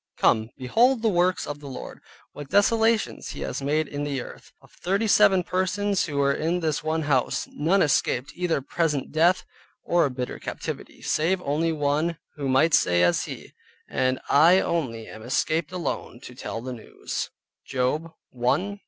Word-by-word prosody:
"Come, 110 0 +3
behold 230 - +2
the 225 - +4
works 180 -1 +1
of 145 0 -6
the 145 - -10
Lord, 130 - -8 0.3
what 145 -1 -9
desolations 220 +2 +2
he - - -8
has - - -3
made 150 +2 0
in 145 0 -4
the 140 -2 -2
earth." - - -10
Of - - -21
thirty 195 +5 -1
seven 190 -3 +5
persons 190 +2 0
who 145 -3 -4
were 140 0 +3
in 165 +5 -1
this 155 -4 -1
one 160 +1 -1
house, 135 -4 0
none 180 +6 +2
escaped 135 -2 +1
either 175 -5 -1
present 150 0 -1
death, 170 +4 +3 0.4
or 175 0 +3
a - - 0
bitter 125 -1 -5
captivity, - - -6
save 175 +5 +1
only 155 +4 0
one, 155 +2 0 0.2
who 140 -3 -3
might 150 +5 +3
say 90 0 +4
as 85 - +2
he, - - -9 0.3
"And 130 0 0
I 165 +6 +6
only 125 -13 -2
am 110 - -11
escaped 150 +7 0
alone 175 -8 -4
to 125 - -10
tell 115 -2 -6
the 130 +1 -5
News" 115 -3 -5 0.3
(Job 140 +6 -1 0.2
1.15). 185 +12 0
155 Hz, 170 wpm, -25 LUFS, 135-180 Hz, 0.4 s, I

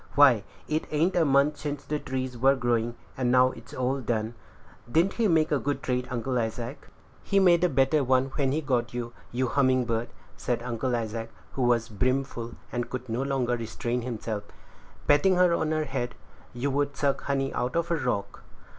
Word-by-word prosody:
Why, 135 -8 +6 0.2
it 155 +1 -1
ain't 160 +5 +1
a 175 - +4
month 140 +1 +3
since 145 -1 -4
the 150 0 -2
trees 130 -2 -3
were 135 +3 +4
growing, 120 -2 0 0.2
and 125 -2 0
now 130 0 +5
it's - - -13
all 130 +2 -1
done. 110 -1 -1 0.6
Didn't 170 +8 +3
he 230 -2 +2
make 160 -4 +3
a 145 - +3
good 145 +1 -2
trade, 125 -1 -1
Uncle 125 +1 -1
Isaac?" 115 +4 -4 0.3
"He 200 - +2
made 175 -2 +5
a 180 - +4
better 135 +1 +3
one 130 +1 +2
when 135 -3 +1
he 155 +3 0
got 125 -4 -1
you, 120 -1 -4 0.2
you 130 +2 0
little - - -4
humming 130 -2 +4
bird," 115 0 -1 0.3
said 120 -1 -2
Uncle 125 +1 -1
Isaac, 115 0 -3 0.2
who 135 - -4
was 120 -2 +3
brim 130 +5 +1
full, 120 -3 -7 0.2
and 120 -1 -2
could 125 -1 -5
no 115 +3 -1
longer 135 -3 0
restrain 120 +1 -3
himself; 110 -3 -4 0.6
patting 145 +6 +5
her 180 -1 +4
on 160 -2 0
the 155 -1 0
head, 120 -3 -3 0.4
"you 130 +4 -2
would 140 0 -1
suck 140 -1 0
honey 135 -1 0
out 125 +4 -2
of 170 0 0
a - - +4
rock." 100 -9 -2
130 Hz, 200 wpm, -27 LUFS, 120-145 Hz, 0.6 s, Why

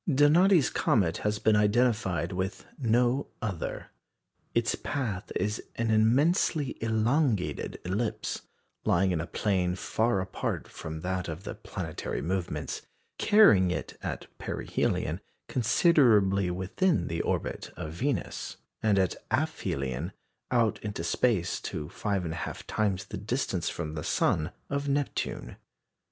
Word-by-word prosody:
Donati's 155 +4 +5
comet 100 - +2
has 105 0 0
been 110 +1 +3
identified 105 -6 +2
with 95 +1 -3
no 125 +2 +2
other. 100 -8 -4 0.6
Its 120 -1 +2
path 110 -10 -3
is 105 +1 -1
an 115 -1 0
immensely 135 +6 +3
elongated 115 - +1
ellipse, 105 +5 -2 0.4
lying 95 +2 +3
in 80 -3 0
a 85 - -5
plane 90 -1 0
far 110 +3 +1
apart 95 0 -3
from 80 0 -7
that 90 0 -2
of 85 +3 -6
the - - -5
planetary - - -5
movements, 90 +1 -2 0.4
carrying 155 - +6
it 90 - -3
at - - -4
perihelion - - -1 0.3
considerably 110 - +4
within 95 - +1
the 85 0 -1
orbit - - -2
of 75 - -5
Venus, 125 - -2 0.2
and 105 -2 +3
at 95 -2 +3 0.2
aphelion 70 +6 -1 0.4
out 115 -3 +2
into 105 -5 -4
space 95 0 +1
to 75 -1 -4
5 100 -3 -1
1/2 85 0 -4
times 100 -4 0
the - - -6
distance 105 -4 -1
from 75 -3 -4
the 75 - -4
sun 80 +1 +1 0.2
of 140 0 -2
Neptune. 140 - -2
105 Hz, 125 wpm, -29 LUFS, 90-125 Hz, 0.6 s, carrying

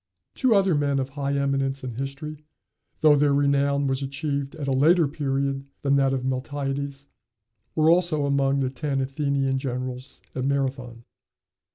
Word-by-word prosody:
Two 255 -4 +3
other 195 -2 +3
men 145 -2 +1
of 135 0 -1
high 140 0 -3
eminence 135 -1 -1
in 125 -2 -4
history, 140 +4 -6 0.6
though 155 -1 +6
their 145 0 +3
renown 140 0 +2
was 135 0 0
achieved 140 0 -3
at 150 -3 -5
a - - +1
later 155 +5 +4
period 140 -1 -2 0.2
than 140 0 +3
that 135 -1 +3
of 130 -1 -2
Miltiades, 140 +1 -3 0.7
were 155 0 +3
also 165 -3 +3
among 140 0 +2
the 130 -1 -1
ten 135 +1 -2
Athenian 135 0 0
generals 130 0 -5
at 130 - -3
Marathon. 130 -3 -2
140 Hz, 155 wpm, -25 LUFS, 135-145 Hz, 0.7 s, though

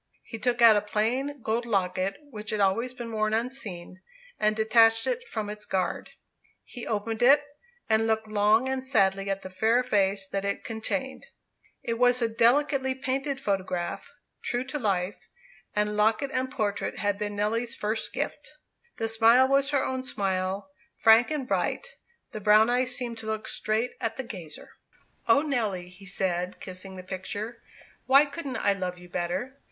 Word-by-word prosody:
He 225 - -8
took 240 0 +1
out 225 -2 +9
a 205 - +3
plain 245 +6 -1
gold 225 +2 0
locket, 195 -3 -1
which 215 -2 -7
had 215 -2 -1
always 200 +6 +1
been 240 -2 -7
worn 215 0 0
unseen, 210 -7 -4 0.4
and 215 0 +2
detached 225 +1 +4
it 485 -1 -2
from 215 - -4
its 210 0 -6
guard. 190 -2 -2 0.5
He 245 - -9
opened 220 +1 -2
it, 280 +4 +6 0.4
and 220 0 +2
looked 220 0 0
long 215 +3 +3
and 265 0 -1
sadly 195 -6 +2
at 195 0 -2
the 185 - -7
fair 225 +6 +2
face 195 -3 +1
that 195 0 -3
it 200 0 -2
contained. 265 +4 -3 0.6
It 230 0 -2
was 250 0 +4
a 235 - +2
delicately 260 +4 +2
painted 270 +1 -2
photograph, 185 -5 -3 0.3
true 245 +1 -1
to 295 - -3
life; 195 -4 -2 0.5
and 210 0 0
locket 220 +6 +2
and 260 0 -1
portrait 205 -5 -2
had 205 -1 -1
been 205 -1 -3
Nelly's 230 +3 -1
first 215 +1 -1
gift. - - -4 0.4
The 225 - -1
smile 225 +3 +5
was 275 +1 +3
her 280 -2 +1
own 260 0 -3
smile, 195 -1 -2 0.3
frank 225 +2 +6
and 295 -4 -3
bright; - - -1 0.4
the 215 - -6
brown 215 +3 +5
eyes 250 0 +2
seemed 240 -3 -4
to 220 - -8
look 220 0 -3
straight 220 +3 -1
at 225 -2 -2
the 265 - -3
gazer. 180 -10 -9 0.6
"O 280 - +5
Nelly," 215 - -2
he 190 +2 -14
said, 180 -1 -2
kissing 190 +1 -7
the 185 - -8
picture, 205 +5 -5 0.5
"why 275 +3 +7
couldn't 280 -3 -5
I 200 - +2
love 185 -2 -4
you 180 0 -13
better? 180 +10 -3
220 Hz, 170 wpm, -27 LUFS, 200-250 Hz, 0.6 s, out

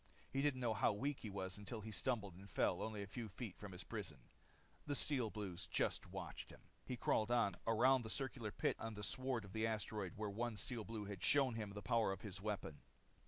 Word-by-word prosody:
He 135 - +3
didn't 140 -3 +2
know 120 -2 +3
how 110 - +4
weak 140 +7 0
he 110 - -5
was 95 0 -3
until 110 +2 -4
he 110 +1 -5
stumbled 105 -3 0
and 95 +3 -11
fell - - +2
only 110 -2 -2
a - - -4
few 110 +2 -4
feet 105 -1 -5
from 100 -2 -7
his 90 0 -5
prison. 100 -10 -4 0.7
The 145 - +1
Steel 130 -6 +2
Blues 95 -4 -4
just - - +1
watched - - -5
him. - - -12 0.2
He 125 - -3
crawled 110 -1 +3
on, 115 -6 +4
around 125 +4 +6
the 110 - -5
circular 130 -3 -1
pit - - +1
in 115 -1 -3
the 105 - -5
sward 130 0 0
of 95 - -11
the 110 0 +2
asteroid 105 -4 -1
where 105 +1 -1
one 115 +1 -1
Steel 120 0 -1
Blue 110 -2 -3
had 100 -2 -5
shown 135 -4 +5
him 110 -2 -2
the 105 0 -5
power 115 -1 +4
of 95 -1 -3
his 100 -3 -5
weapon. 100 -7 -2
110 Hz, 225 wpm, -42 LUFS, 100-120 Hz, 0.7 s, around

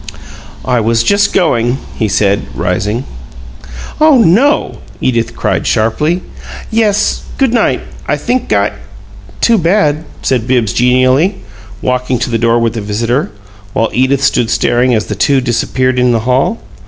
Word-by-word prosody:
"I 125 -1 +1
was 115 +1 +1
just 200 0 +2
going," 120 -8 +1 0.2
he 110 - -1
said, 100 -7 0
rising. 105 - -1 1.0
"Oh 305 -2 +5
NO!" 230 - +2 0.2
Edith 120 -2 -1
cried, - - -1
sharply. 150 +11 0 0.5
"Yes. 215 -2 +1 0.2
Good 265 -4 +1
night! 220 - +1 0.3
I - - 0
think 245 - -2
I - - +2 0.4
" - - -20
"Too 230 -2 +3
bad," 165 -4 +1 0.2
said 125 -3 0
Bibbs, 120 -6 +1
genially, 130 - +2 0.5
walking 125 0 0
to 120 +1 -3
the 115 - 0
door 115 0 +2
with 115 -1 0
the 115 - -4
visitor, 115 +7 -1 0.4
while 115 - 0
Edith 130 +2 +1
stood 120 -4 +1
staring 120 +1 +1
as 110 - -1
the - - -4
two 135 +8 +2
disappeared 130 +1 0
in 125 -1 +3
the 115 - 0
hall. 130 - +1
125 Hz, 150 wpm, -12 LUFS, 115-165 Hz, 1.0 s, Oh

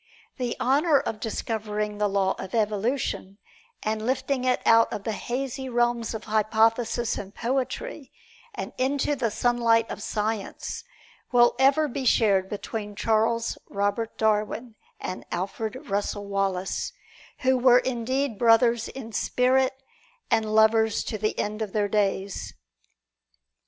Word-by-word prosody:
The 245 -3 -2
honor 285 +3 +3
of 215 - -4
discovering 210 -2 -3
the 210 - +3
Law 195 -1 +1
of 190 - -5
Evolution, 215 -2 -1 0.5
and 215 0 -1
lifting 260 +1 -1
it 250 -1 +2
out 230 0 +5
of 200 - -4
the 220 - -2
hazy 265 +4 -4
realms 240 -1 0
of 220 - -6
hypothesis 225 +2 +1
and 200 +1 -9
poetry 270 - -3 0.7
into 280 +2 +1
the 240 -4 0
sunlight 230 0 +2
of - - -6
science, 215 -1 -3 0.5
will 240 -1 +5
ever 275 +3 +4
be 270 0 -4
shared 200 -6 +3
between 210 0 -5
Charles 225 +2 +1
Robert 205 +3 -1
Darwin 220 +2 0 0.3
and 185 - -5
Alfred 200 +5 -3
Russel 205 0 -2
Wallace, 195 -2 -1 0.5
who 260 0 +3
were 250 -1 +6
indeed 255 -1 -1
brothers 230 0 +4
in 240 -4 -8
spirit 260 +4 +1 0.5
and 215 -1 +1
lovers 220 0 +4
to 215 - -4
the 215 +1 -1
end 215 +1 -2
of 210 -3 -3
their 210 -1 +1
days. 200 -1 -1
225 Hz, 130 wpm, -26 LUFS, 210-250 Hz, 0.7 s, were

